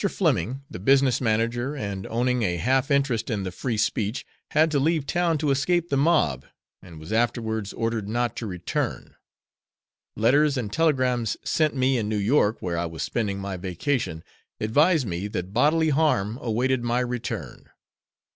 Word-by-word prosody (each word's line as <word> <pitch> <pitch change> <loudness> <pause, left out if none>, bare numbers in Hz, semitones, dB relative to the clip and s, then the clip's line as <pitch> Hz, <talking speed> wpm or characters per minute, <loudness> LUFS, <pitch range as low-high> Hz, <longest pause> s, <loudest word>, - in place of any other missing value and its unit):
Fleming, 135 - 0
the - - -8
business 135 +4 +3
manager 120 +4 0
and 100 -7 -4
owning 125 +2 0
a 90 -5 0
half 130 - +1
interest 135 -6 +1
the 100 -5 -2
Free 115 +5 -3
Speech, 105 +1 -1 0.2
had 155 +1 +3
to 145 - +2
leave 155 0 +1
town 170 0 +1
to 150 -1 0
escape 170 +5 +1
the - - +1
mob, 135 - +2 0.4
and 85 -4 -12
was 80 +7 -7
afterwards 110 -2 0
ordered 115 -3 -2
not 120 0 -1
to 115 - -4
return; 90 -2 -4 1.0
letters 140 +6 +3
and 105 -5 -3
telegrams 130 -8 +1
sent 155 -2 +1
me 130 -1 +2
in 105 -2 -2
New 110 - -1
York 105 +1 +2
where 85 -2 -1
I 85 - -1
was 80 -1 -5
spending 105 -4 -2
my 100 -1 -4
vacation 90 - -2 0.4
advised 150 +7 +3
me 90 0 -3
that 95 -2 -5
bodily 155 +6 +3
harm 135 -7 +1
awaited 125 +2 0
my 120 +1 +1
return. 125 -1 -5
120 Hz, 160 wpm, -25 LUFS, 105-140 Hz, 1.0 s, business